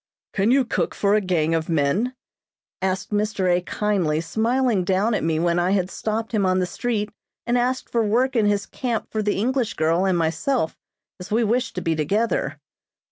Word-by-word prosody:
"Can 200 +2 +2
you 265 +1 +4
cook - - -1
for 200 0 +2
a 215 - +4
gang 165 -4 +1
of 165 0 -1
men?" 165 - +1 0.7
asked 190 +1 -2
Mr. 205 -3 +1
A. 180 - 0
kindly 180 -6 0
smiling 225 +4 +1
down 195 +5 +1
at - - 0
me 160 -1 +1
when 170 +1 +2
I 180 +2 +2
had 190 -2 0
stopped 220 +1 -3
him 215 -4 +1
on 185 0 +2
the 185 - +1
street 210 +1 -2 0.3
and 240 - +1
asked 250 +1 0
for 230 -1 +1
work 245 +5 +1
in 220 -3 +3
his 205 -1 +1
camp 240 -4 -3
for 215 - -1
the 205 -1 0
English 250 +2 0
girl 165 +4 +2
and 185 -2 +2
myself, 165 +5 0 0.4
as 180 - -8
we 225 +3 +2
wished 235 +3 0
to 180 - -2
be 165 -2 0
together. 205 +10 0
205 Hz, 195 wpm, -23 LUFS, 175-230 Hz, 0.7 s, you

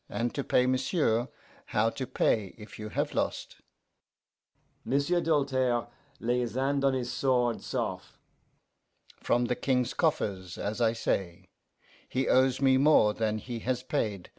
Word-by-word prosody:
'And 120 +1 -2
to 140 - -2
pay, 125 - +2
m'sieu', 130 -2 +1 0.4
how 110 +2 +1
to 130 +1 -5
pay 105 -4 0
if 105 0 -12
you 105 0 -6
have - - -2
lost?' - - -2 1.3
M'sieu' 140 +6 +1
Doltaire 130 -6 +1 0.3
lay 120 +2 0
his 120 -2 -3
hand 135 +1 0
on 135 -1 +3
his 120 -2 -3
sword 125 -2 +1
sof'. - - -4 1.0
'From 120 0 +1
the 125 - 0
King's 125 -2 0
coffers, 100 - -1
as 110 +4 -3
I 115 -1 +3
say; 95 -5 -3 0.6
he 130 +1 -1
owes 130 0 +3
me 135 -1 +4
more 135 -7 +5
than 110 -1 -1
he 120 +1 -6
has 125 +2 -2
paid. 105 -10 -2
125 Hz, 145 wpm, -29 LUFS, 110-135 Hz, 1.3 s, more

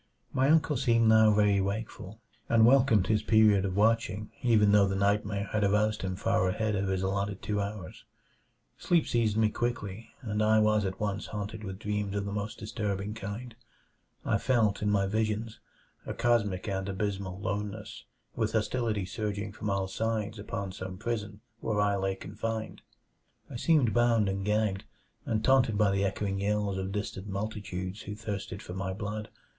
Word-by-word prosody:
My 130 +2 +3
uncle 155 -2 +3
seemed 115 -3 +3
now 110 -1 +6
very 105 -1 +3
wakeful, 100 +1 -4 0.3
and 115 -1 +6
welcomed 120 -6 +5
his 110 -1 +2
period 110 -3 +4
of 95 -1 -2
watching 110 -1 +1
even 110 -4 +4
though 100 -1 +5
the 95 - -1
nightmare 100 0 0
had 105 -1 +1
aroused 105 +2 +2
him 95 -1 -2
far 95 -1 +1
ahead 105 +3 0
of 100 0 -1
his 95 -1 -1
allotted 100 +1 -2
two 105 0 -1
hours. 100 -4 -6 0.8
Sleep 170 -2 +2
seized 110 -3 +1
me 110 -1 +4
quickly, 115 -2 -3
and 105 -2 -1
I 110 0 +4
was 110 -1 +3
at 95 0 -4
once 105 -1 -2
haunted 105 +1 -5
with 95 -2 -5
dreams 105 -2 -2
of 100 0 -1
the 100 - -4
most 105 +1 -4
disturbing 105 -1 -3
kind. 115 +3 -6 0.7
I - - +2
felt, 110 -6 +2
in 105 - +1
my 100 -1 +2
visions, 110 +2 -1 0.4
a - - -5
cosmic 105 -5 +1
and 95 -1 -2
abysmal 95 -1 -3
loneness; 105 +2 -4 0.3
with 110 -2 -1
hostility 110 -2 0
surging 105 +1 -3
from 105 0 -5
all 100 -1 0
sides 110 +1 -2
upon 100 -2 -4
some 95 0 -7
prison 105 -2 -4 0.2
where 110 -2 -1
I 100 -1 +2
lay 95 0 -1
confined. 110 +2 -5 0.7
I - - -7
seemed 130 -3 +3
bound 115 -3 +3
and 95 0 -2
gagged, 105 -1 0 0.4
and 110 -1 0
taunted 130 -5 +4
by 105 -2 +3
the 100 0 +1
echoing 100 0 -1
yells 100 -1 0
of 95 0 -3
distant 100 -1 -4
multitudes 100 -1 -4
who 105 - -6
thirsted 100 -2 -5
for 90 - -7
my 95 0 -3
blood. 105 +1 -5
105 Hz, 170 wpm, -29 LUFS, 100-110 Hz, 0.8 s, now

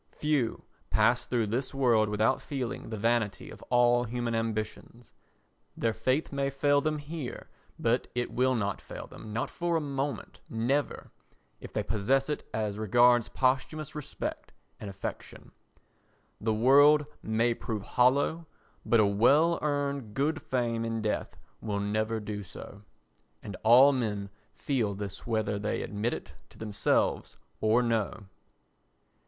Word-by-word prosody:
Few 145 -6 0 0.3
pass - - +2
through 120 -3 +1
this 125 +6 -3
world 115 -5 +3
without 110 +4 +1
feeling 130 -6 -4
the 110 - -4
vanity 110 -2 0
of - - -12
all 120 0 +4
human 120 0 -2
ambitions; 115 +1 -4 0.7
their 115 -1 0
faith 130 +7 0
may 140 -1 0
fail 145 +1 +2
them 155 +1 0
here, 145 -2 -7 0.3
but 120 +2 +1
it 125 0 -1
will 130 +1 +2
not 100 -4 -2
fail - - -8
them—not 110 +1 -5
for 170 -1 -1
a - - +1
moment, 140 -1 -4
never—if 125 +6 -4
they - - -1
possess 130 +7 +1
it 150 - -4
as 105 -1 -2
regards 120 +2 +4
posthumous 135 +5 0
respect 150 -2 -6 0.3
and 105 - -6
affection. 95 0 -7 0.9
The 110 - 0
world 145 +7 +6 0.2
may 115 +2 +1
prove 110 -3 -5
hollow 140 +8 +2 0.4
but 115 - +3
a 110 - +5
well 140 +12 +4
earned 140 -6 -2
good 155 +3 0
fame 120 -3 -1
in 115 -1 -2
death 105 - -2 0.2
will 105 -2 -2
never 110 +2 -1
do 105 -1 -5
so. 100 +1 -10 0.6
And 100 - -6
all 125 +5 +7
men 105 -6 -2 0.2
feel 115 -8 -1
this 100 +1 -7
whether 110 -3 0
they 105 - -2
admit 105 +3 -2
it - - -9 0.2
to - - -19
themselves 105 -2 0 0.2
or 110 +3 +3
no. 110 -2 -1
120 Hz, 140 wpm, -29 LUFS, 110-135 Hz, 0.9 s, all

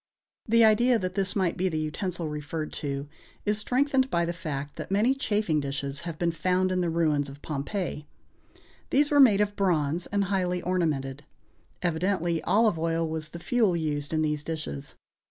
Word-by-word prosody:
The 230 0 +6
idea 235 +3 +4
that 185 -3 -3
this 195 -1 0
might 185 -4 +1
be 185 +1 +1
the 160 - -2
utensil 165 +2 -3
referred 150 +1 -4
to 140 -1 -3 0.4
is 210 0 +2
strengthened 265 +3 +2
by 170 -5 +1
the 170 - -2
fact 145 -4 -5
that - - -6
many 210 +7 +3
chafing 210 - 0
dishes 140 0 -4
have 160 - -6
been 170 0 +1
found 185 +3 +1
in 185 0 +1
the 175 - 0
ruins 155 -4 +1
of 140 +1 -12
Pompeii. 150 +1 -3 0.8
These 290 +2 +3
were 290 - +5
made 215 -7 +7
of 205 0 0
bronze, 170 -4 +1
and 200 0 0
highly 180 -2 0
ornamented. 150 -6 -1 0.6
Evidently, 175 0 0
olive 215 -5 +3
oil 165 0 0
was 155 -1 -4
the 170 - -8
fuel 200 0 +1
used 145 -3 -2
in 155 -1 +1
these 150 -1 -1
dishes. 155 - -5
170 Hz, 175 wpm, -27 LUFS, 150-200 Hz, 0.8 s, made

